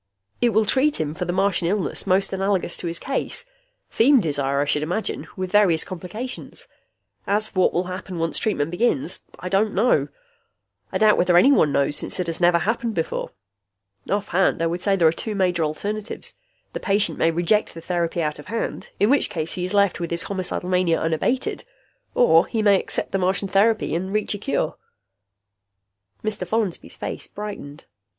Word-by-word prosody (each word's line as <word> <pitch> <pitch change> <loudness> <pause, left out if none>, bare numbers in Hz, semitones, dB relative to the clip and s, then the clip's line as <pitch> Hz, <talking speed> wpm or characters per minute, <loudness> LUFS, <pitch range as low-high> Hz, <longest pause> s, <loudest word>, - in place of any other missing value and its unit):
"It 240 - +4
will 220 0 +2
treat 275 +7 +2
him 150 -1 -2
for 180 +2 -4
the 175 - -1
Martian 190 -2 +1
illness 200 +1 -1
most 195 +1 +2
analogous 190 -2 0
to - - -4
his 170 0 -3
case. 275 - -3 0.5
Feem 265 +4 +5
desire, 140 -6 0
I 145 - +2
should 145 +1 +1
imagine, 175 +8 -3
with 185 -1 -3
various 195 -6 +4
complications. 200 +8 -7 0.6
As 210 +2 +2
for 185 - -4
what 185 - +3
will 175 - +2
happen 185 0 -6
once 165 0 0
treatment 165 -8 -1
begins, 175 - +1 0.2
I 180 - -6
don't 200 +3 +1
know. 225 +6 +3 0.8
I - - 0
doubt 215 -1 +4
whether 175 -1 +4
anyone 215 - +5
knows, 140 +1 +1
since - - -3
it 180 - 0
has 165 +1 -4
never 175 0 +5
happened 225 +4 -1
before. 165 -1 -2 0.8
Offhand, 195 -3 +1
I - - +2
would 170 +2 -2
say 200 0 +2
there 170 -4 +4
are - - +5
two 210 +6 -4
major 180 -4 +1
alternatives: 205 +8 -4 0.4
the - - -3
patient 200 +1 +1
may 165 - +4
reject 175 +6 +1
the - - -7
therapy 170 -1 -1
out 150 -1 -2
of 150 - -11
hand, 230 +2 -4
in 205 +5 +4
which 285 - +3
case 160 -1 -2
he 180 - -3
is 185 - -3
left 200 -2 +3
with 170 -1 -3
his 170 0 -1
homicidal 185 -2 -3
mania 180 -2 +2
unabated. 165 +11 -1 0.5
Or 165 -8 +5
he 225 -2 -1
may 200 -2 +5
accept - - -1
the 195 - 0
Martian 190 +2 0
therapy 215 +1 +2
and 185 +3 -2
reach 215 +1 0
a 205 - -5
cure." 205 - -1 1.5
Mr. 210 -4 -2
Follansby's 215 -3 -2
face - - -6
brightened. 200 -8 -8
185 Hz, 185 wpm, -23 LUFS, 170-210 Hz, 1.5 s, Feem